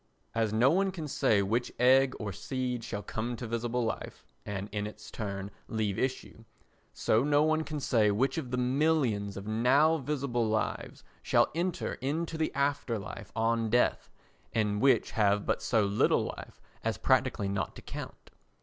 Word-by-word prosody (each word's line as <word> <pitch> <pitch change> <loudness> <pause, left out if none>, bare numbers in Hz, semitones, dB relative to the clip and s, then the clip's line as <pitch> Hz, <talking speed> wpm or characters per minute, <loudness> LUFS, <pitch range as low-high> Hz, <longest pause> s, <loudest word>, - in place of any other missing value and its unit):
As 115 -2 +1
no 120 +5 +4
one 195 +3 +2
can 170 -5 -5
say 105 -7 +2
which 115 +5 -1
egg 130 +1 +5
or 100 -3 -4
seed 125 +3 -3
shall 105 -1 -5
come 115 +2 -3
to 120 - -6
visible 115 +1 -1
life 115 - -5 0.2
and 100 -1 -4
in 105 0 -2
its 105 0 -11
turn 100 -2 -5 0.2
leave 105 -3 -1
issue, 130 -3 -3 0.5
so 110 +3 +2
no 145 +1 +3
one 155 0 +2
can 155 -1 -4
say 115 -6 +3
which 130 +10 +1
of 130 -6 -6
the 125 - -2
millions 125 -6 +1
of 100 - -6
now 130 +9 +3
visible 135 -5 -1
lives 110 0 -2 0.2
shall - - +3
enter 175 +2 -2
into 160 +5 -2
the 160 0 -1
afterlife 140 -7 -2
on 115 0 +1
death, 120 +2 +2 0.4
and 105 -2 0
which 135 0 +3
have 105 -2 +2
but - - 0
so 110 -3 +2
little 100 +1 +2
life - - -11 0.2
as 115 0 -1
practically 130 -5 +2
not 100 0 -2
to - - -11
count. - - -8
120 Hz, 170 wpm, -30 LUFS, 105-140 Hz, 0.5 s, egg